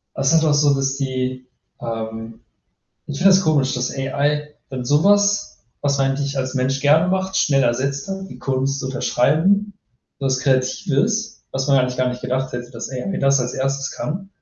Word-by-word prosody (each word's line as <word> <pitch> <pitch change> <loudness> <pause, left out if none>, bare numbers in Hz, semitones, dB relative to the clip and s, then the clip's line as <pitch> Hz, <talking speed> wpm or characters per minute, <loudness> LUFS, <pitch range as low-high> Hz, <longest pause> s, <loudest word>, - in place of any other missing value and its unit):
Das 135 0 +1
ist 160 -1 +4
auch 150 - +3
so, 145 -1 +4
dass 135 0 0
die 130 -1 -3 0.3
ähm, 115 0 -6 0.7
ich 145 - -5
finde 195 +2 +6
das 190 - +5
komisch, 150 -7 +2
dass 125 0 -1
AI 145 +2 -1
dann 130 -2 -5
so 145 +4 +3
was, 205 -3 +2 0.2
was 140 -1 +1
man 135 0 +2
eigentlich 140 +1 -2
als 130 -1 -2
Mensch 135 +1 -1
gerne 155 +5 +4
macht, 190 0 0
schnell 135 -2 +3
ersetzt 135 +3 0
hat, 195 0 -5
die - - -11
Kunst 135 +1 -1
zu - - -5
unterschreiben, 160 +11 +2 0.5
was 130 -1 0
Kreatives, 140 - 0
was 135 +1 -2
man 135 -1 +5
eigentlich 125 -1 0
gar 130 0 +1
nicht 125 - -6
gedacht 130 +1 -2
hätte, 120 0 -6
dass 120 0 -7
AI 135 +9 -3
das 135 0 +3
als 125 0 -3
1. 135 +1 -1
kann 185 +5 -5
135 Hz, 185 wpm, -21 LUFS, 130-155 Hz, 0.7 s, finde